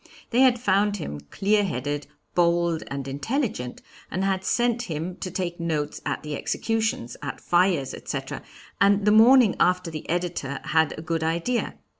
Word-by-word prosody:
They 240 - +2
had 255 -2 +5
found 205 -2 +2
him 75 - -5
clear 205 - +2
headed, 145 -4 -3 0.3
bold, 170 -1 +2
and 140 -1 -5
intelligent, 145 - -3 0.3
and 185 - -2
had 190 -1 0
sent 240 +3 +1
him 165 +3 -3
to 185 - -5
take 175 -1 -3
notes 155 -3 -2
at - - -2
the 150 -1 -4
executions, 220 - -1
at 145 - -5
fires, 175 -6 +2
etc., - - -5 0.4
and 200 0 +4
the 210 - +5
morning 230 0 +7
after 180 -1 +2
the 155 -1 -7
editor 170 -5 -2
had 160 -1 +1
a 155 - -7
good 165 -1 -1
idea. 170 +10 -1
175 Hz, 160 wpm, -25 LUFS, 155-205 Hz, 0.4 s, morning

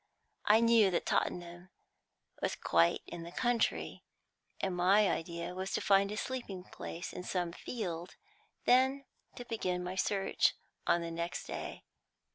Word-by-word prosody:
I 220 +2 +6
knew 230 -3 +6
that 175 - 0
Tottenham 175 +1 -1 0.7
was - - 0
quite 85 0 +3
in 175 - -7
the 170 +1 -8
country, 240 +2 0 0.6
and 190 -2 -1
my 195 +4 +5
idea 170 0 -3
was 190 +1 -4
to - - +1
find 200 0 +3
a 210 - -4
sleeping 225 -8 -4
place 175 -1 -7
in 180 - -5
some 175 -2 -1
field, 175 -4 -5 0.5
then 265 +2 +4 0.3
to 245 - -7
begin 185 -6 -2
my 180 +1 -3
search 195 +1 +1 0.3
on 170 - +4
the 170 0 -4
next 170 +1 -3
day. - - -6
185 Hz, 145 wpm, -33 LUFS, 175-220 Hz, 0.7 s, I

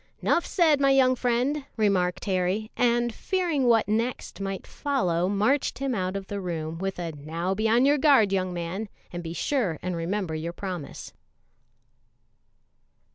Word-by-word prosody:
"'Nough 340 - +1
said, 315 -5 +3
my 275 - +4
young 260 -1 +5
friend," 250 +4 0
remarked 190 -4 +1
Harry, 190 +3 0
and 240 -1 +2
fearing 335 - 0
what 230 -2 +4
next 225 0 -2
might 195 -1 -4
follow, 185 -12 0
marched 215 +8 +1
him 270 -1 -1
out 185 -3 -2
of 195 -1 -4
the 200 +1 -5
room 165 -2 -4
with 195 0 -3
a 170 -2 -3
"Now 160 +5 -3
be 215 +3 0
on 240 +4 +4
your 290 +1 +4
guard, 260 -9 +5
young 185 -1 0
man, 180 +5 -4 0.2
and 175 - -4
be 165 -1 -6
sure 205 - 0
and 180 0 -2
remember 175 +1 -2
your 160 +2 -4
promise." 175 - -6
200 Hz, 160 wpm, -26 LUFS, 180-255 Hz, 0.2 s, young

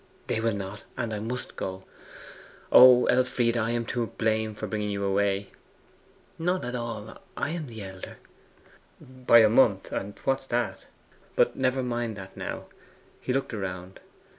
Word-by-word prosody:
'They - - -1
will 115 -2 +1
not; 100 +2 -6
and 115 -3 -2
I 105 - -2
must 120 +4 -5
go.' 95 0 -5 0.9
'O 125 -1 +9
Elfride! 125 -2 +2
I 115 -1 0
am 120 0 -1
to 120 0 -2
blame 110 -1 -1
for 110 - -5
bringing 105 0 -2
you 100 -1 -2
away.' 100 0 0 0.9
'Not 180 0 0
at 125 - -4
all. 115 -3 -5 0.2
I 145 - -1
am 165 -3 -4
the 110 -3 -8
elder.' 95 -1 -9 0.8
'By 125 -2 +4
a - - +7
month; 105 -6 +3
and 100 +1 -4
what's 135 0 0
that? 120 -6 -2 0.5
But - - +3
never 130 0 +1
mind 120 -2 -2
that 95 -1 -10
now.' - - -5 0.5
He - - -3
looked 135 -1 -1
around. 95 -2 -5
115 Hz, 160 wpm, -27 LUFS, 100-125 Hz, 0.9 s, O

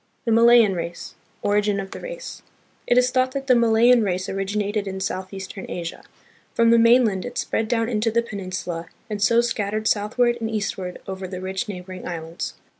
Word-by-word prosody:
The 230 - +1
Malayan 230 -2 +6
Race. 170 -1 -5 0.3
Origin 205 0 +1
of 195 -1 -6
the - - -7
Race. - - -8 0.5
It 245 - +3
is 250 0 +4
thought 255 0 +1
that 275 -1 -3
the 260 - +5
Malayan 235 +1 +5
race 185 -2 -1
originated 205 +1 -2
in 190 0 -4
southeastern 190 +1 -5
Asia. 170 -1 -5 0.5
From 230 0 +4
the 235 - +6
mainland 230 -4 +4
it 245 - -7
spread 220 - -1
down 230 0 +1
into 225 -1 0
the 235 +1 +1
pen 215 -3 -7
insula 175 -3 -5 0.2
and 205 -1 -3
so 235 +3 +4
scattered 215 -2 -2
southward 235 +4 +1
and 225 - -1
eastward 195 -4 -3
over 190 -1 -5
the 185 0 -6
rich 190 +4 -4
neighboring 185 -1 -7
islands. 165 -1 -5
210 Hz, 185 wpm, -23 LUFS, 190-235 Hz, 0.5 s, Malayan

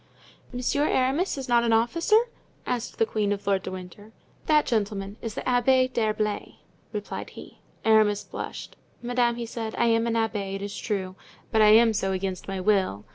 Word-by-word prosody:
"Monsieur 260 +4 0
Aramis 275 +7 +1
is 270 - -5
not 240 -1 +3
an 230 -1 +2
officer?" 325 - +3 0.5
asked 245 -2 -3
the 225 - +3
queen 215 -2 -1
of 205 0 -3
Lord 195 -1 +1
de - - -6
Winter. 185 +3 -10 0.4
"That 300 -1 +4
gentleman 205 -2 -2
is 225 -2 -5
the - - -3
Abbé 255 +1 +3
d'Herblay," 215 -2 -1 0.4
replied 210 -2 -5
he. - - -13 0.3
Aramis 215 -2 +4
blushed. - - -7 0.3
"Madame," 240 -1 +1
he 235 0 -4
said, 225 -1 -5
"I 235 - +3
am 230 0 +2
an 230 - 0
abbé, 210 -4 -1
it 195 - -5
is 200 0 -5
true, 190 -4 -3 0.4
but 220 -2 +3
I 215 - +7
am 225 +1 +6
so 195 -2 -1
against 190 -1 -4
my 195 -1 -3
will. 185 - +1
220 Hz, 185 wpm, -26 LUFS, 200-240 Hz, 0.5 s, I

